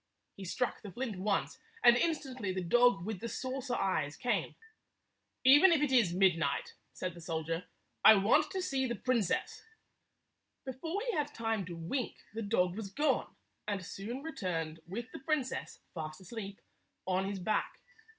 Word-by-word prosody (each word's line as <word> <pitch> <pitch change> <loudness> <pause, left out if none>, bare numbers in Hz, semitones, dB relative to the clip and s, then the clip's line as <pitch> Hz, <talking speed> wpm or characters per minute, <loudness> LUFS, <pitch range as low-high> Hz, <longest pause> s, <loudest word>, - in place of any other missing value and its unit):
He 195 - -8
struck 250 +7 -1
the 205 - -8
flint 230 -2 -4
once, 200 +1 -1 0.2
and 240 - +8
instantly 260 - -1
the 185 0 -2
dog 220 0 +4
with 215 -3 -3
the 230 - -4
saucer 260 0 -3
eyes 145 -9 0
came. 245 - -1 0.5
" - - -50
Even 345 +6 +8
if 330 - +4
it 290 - +1
is 235 -9 +4
midnight," 180 -2 +2 0.2
said 180 -1 -4
the 170 - -11
soldier, 165 +1 -3 0.2
" - - -47
I 220 - +10
want 225 +10 +4
to 375 -1 -3
see 270 -7 0
the 240 - -2
princess." 230 -3 0 1.0
Before 320 +9 -3
he - - +2
had 295 -1 -1
time 225 -4 -1
to 175 - -6
wink, 175 +10 -3 0.2
the 225 - -3
dog 185 -4 +1
was 215 -3 -5
gone, 290 +10 0 0.3
and 200 -3 -2
soon 230 +10 -6
returned 165 - -3
with 230 +7 -6
the - - -8
princess, 270 -2 -2
fast 155 -1 -6
asleep, 200 0 -7 0.4
on 190 +1 0
his 200 - -3
back. 190 +4 -1
215 Hz, 170 wpm, -33 LUFS, 185-260 Hz, 1.0 s, I